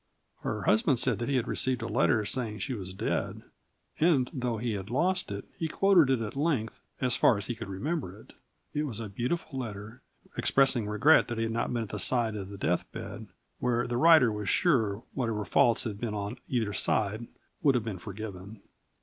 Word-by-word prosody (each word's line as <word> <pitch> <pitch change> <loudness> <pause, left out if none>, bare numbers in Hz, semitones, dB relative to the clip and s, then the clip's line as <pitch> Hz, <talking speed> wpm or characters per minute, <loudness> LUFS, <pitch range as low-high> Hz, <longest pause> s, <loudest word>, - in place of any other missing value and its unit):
Her - - -3
husband 110 +5 +3
said 120 -2 +2
that 120 - -2
he 140 - +1
had 125 -1 0
received 130 -2 0
a - - -2
letter 115 -1 +2
saying 110 -2 -2
she 130 - -3
was 95 -5 -6
dead, - - -2 0.6
and, 150 -6 +3
though 125 -3 -2
he 115 +1 -2
had 100 0 -5
lost 180 - 0
it, 100 0 -5
he 165 - 0
quoted 180 -3 +4
it 125 -4 +1
at 105 - -7
length 140 -7 -1 0.2
"as 125 -2 +2
far 115 - +4
as 100 - -4
he 120 - -2
could 110 - -7
remember 105 - -3
it." - - -17 0.4
It 150 +1 0
was 115 -5 -4
a 110 -2 -5
beautiful 130 - -3
letter, 110 0 -7 0.3
expressing 135 -5 +2
regret 110 +10 +5
that 120 - -4
he 115 - 0
had 110 0 -2
not 115 - -1
been 120 -2 -1
at 105 - -8
the - - -5
side 115 -4 +1
of 100 -2 -6
the 100 - -8
deathbed, 90 -2 -3 0.3
where, 120 -1 +1
the 120 - -3
writer 155 -4 +6
was 105 -3 -3
sure, 115 - +2
whatever 115 -5 -2
faults 115 +5 +3
had 105 -4 -5
been 110 -3 -2
on 105 +4 -4
either 115 -5 0
side 110 +4 0 0.3
would 140 -4 +4
have 120 - +1
been 100 -5 -4
forgiven. 100 0 -8
115 Hz, 205 wpm, -29 LUFS, 105-130 Hz, 0.6 s, writer